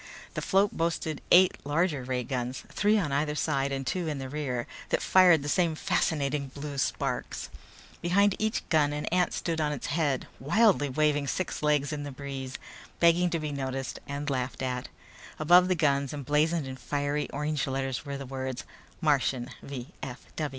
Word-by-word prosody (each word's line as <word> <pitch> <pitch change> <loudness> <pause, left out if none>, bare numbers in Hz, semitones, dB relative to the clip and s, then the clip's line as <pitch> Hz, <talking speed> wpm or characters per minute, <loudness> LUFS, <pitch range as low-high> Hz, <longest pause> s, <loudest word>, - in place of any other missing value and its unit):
The - - -3
float 200 +1 +2
boasted 165 -2 -1
eight 185 +1 +6
larger 150 -1 0
ray 125 0 -2
guns, 125 0 -3
three 210 +1 +3
on 170 -9 0
either 150 +2 0
side 140 -3 0
and 135 -1 -3
two 175 +4 -1
in 150 -2 -2
the 135 -1 -5
rear, 130 -4 -2 0.2
that - - +2
fired 180 -5 +5
the - - -4
same 165 +1 +2
fascinating 150 -6 0
blue 140 +1 -6
sparks. - - -2 0.5
Behind 200 +3 +3
each 220 0 -1
gun 150 -4 +3
an 150 0 -3
ant 180 0 +2
stood 165 -1 -2
on 150 -1 +1
its 145 - -4
head, 145 -5 +1
wildly 170 - +3
waving 145 +1 +1
six 185 +5 -2
legs 150 -1 +2
in 150 - -3
the 145 0 -5
breeze, 135 -1 -6 0.4
begging 170 +1 +5
to 170 - 0
be 155 -2 -3
noticed 135 -2 -3
and 140 +1 -4
laughed 130 -1 -2
at. 125 -1 -2 0.5
Above 175 +4 +6
the 185 - +2
guns, 140 -3 +1
emblazoned 150 +3 +1
in 130 0 -6
fiery 145 +3 -2
orange 150 0 -1
letters, 135 -1 -2
were 140 -2 -5
the 140 - -6
words: 130 -1 -4 0.4
"MARTIAN 135 -4 +1
V. 135 -1 -7
145 Hz, 170 wpm, -28 LUFS, 135-165 Hz, 0.5 s, eight